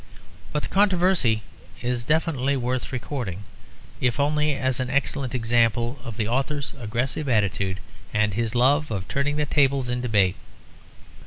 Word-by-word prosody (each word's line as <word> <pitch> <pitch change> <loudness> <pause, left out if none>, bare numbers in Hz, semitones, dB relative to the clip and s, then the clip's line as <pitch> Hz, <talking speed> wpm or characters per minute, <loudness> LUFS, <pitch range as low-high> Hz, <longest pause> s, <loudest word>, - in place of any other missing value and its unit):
But 150 - -1
the - - -4
controversy 180 - +3 0.4
is 120 -1 -1
definitely 140 -2 +1
worth 125 +1 -2
recording, 120 -7 -4 0.6
if 125 +1 0
only 150 +1 +2
as 130 -1 0
an 130 -1 -1
excellent 140 -1 -1
example 120 +2 +1
of 115 -4 -7
the 110 -3 0
author's 135 +4 -1
aggressive 125 +6 -2
attitude 100 -4 +1 0.3
and 105 -1 +1
his 115 +2 -1
love 140 +5 +3
of 95 -4 -3
turning 140 +1 0
the 150 0 +1
tables 135 -4 +2
in 125 0 -1
debate. 100 -6 +2
125 Hz, 145 wpm, -24 LUFS, 115-140 Hz, 0.6 s, controversy